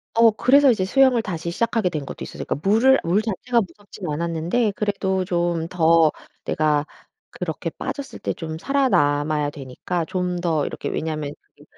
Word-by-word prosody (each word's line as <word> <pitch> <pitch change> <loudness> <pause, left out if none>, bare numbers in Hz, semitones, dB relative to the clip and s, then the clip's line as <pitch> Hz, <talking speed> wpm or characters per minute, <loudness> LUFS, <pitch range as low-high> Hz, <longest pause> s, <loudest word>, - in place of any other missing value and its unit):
어 230 0 +6
그래서 270 +6 +5
이제 210 -5 0
수영을 255 +4 +4
다시 170 -5 -4
시작하게 225 +1 0
된 155 -5 -4
것도 - - -7
있었어요. - - -7
그니까 - - -1
물을 255 +6 +5
물 175 +5 +2
자체가 230 +3 0
무섭진 200 -3 -10
않았는데 170 +8 0
그래도 195 -3 -1
좀 170 -2 -1
더 165 -3 +4 0.3
내가 150 -1 +1 0.4
그렇게 - - -4
빠졌을 280 -2 -6
때 - - -2
좀 160 -2 -6
살아 275 +8 +1
남아야 145 -2 +2
되니까 145 +6 -4
좀 180 +1 -2
더 160 -4 +1
이렇게 - - -4
왜냐하면 155 -2 -3 0.3
그 - - -17
180 Hz, 360 characters per minute, -22 LUFS, 160-220 Hz, 0.4 s, 어